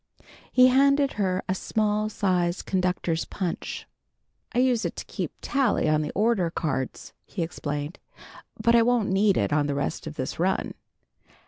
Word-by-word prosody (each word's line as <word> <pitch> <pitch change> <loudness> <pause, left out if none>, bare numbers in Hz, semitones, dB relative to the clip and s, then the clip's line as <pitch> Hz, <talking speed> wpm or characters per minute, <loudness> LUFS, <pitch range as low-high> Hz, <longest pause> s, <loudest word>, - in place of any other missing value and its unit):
He 255 0 +6
handed 275 +2 +4
her 185 -1 0
a 185 - +1
small 215 +2 0
sized 180 -4 0
conductor's 180 -3 0
punch. 180 -4 -4 0.7
"I 240 - -4
use 250 -2 +3
it - - -3
to - - -6
keep - - -4
tally 275 - +1
on 155 0 +3
the 150 - -3
order 205 -4 +2
cards," 145 -6 -3
he 180 - -4
explained, 150 0 -4 0.6
"but 235 - +3
I 235 - +6
won't 235 -2 +2
need 195 0 +3
it - - +1
on 145 -1 +2
the 145 - -1
rest 145 +3 -3
of 155 - -6
this 130 +2 -4
run." 185 +3 0
190 Hz, 160 wpm, -26 LUFS, 160-230 Hz, 0.7 s, He